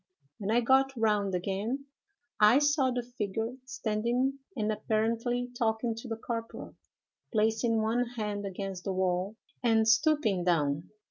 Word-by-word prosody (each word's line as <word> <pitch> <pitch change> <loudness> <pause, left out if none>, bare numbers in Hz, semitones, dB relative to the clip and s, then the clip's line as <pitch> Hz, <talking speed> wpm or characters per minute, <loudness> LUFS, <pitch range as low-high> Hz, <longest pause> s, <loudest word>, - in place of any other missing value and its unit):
When 200 -1 -3
I 235 +2 +4
got 265 +3 +4
round 210 -4 +1
again, 205 +9 -2 0.5
I 210 +4 +7
saw 290 -2 +3
the 245 -1 -1
figure 225 -1 -3
standing 245 +3 -1 0.2
and 215 0 0
apparently 230 +3 -1
talking 225 0 0
to 230 +3 -8
the 225 - -2
corporal, 230 0 -5 0.6
placing 220 0 +2
one 235 +3 +1
hand 210 -2 -2
against 195 -1 -5
the 195 - -1
wall 185 +2 0 0.3
and 225 -3 +3
stooping 220 - +3
down. 155 -3 +1
220 Hz, 135 wpm, -30 LUFS, 205-245 Hz, 0.6 s, I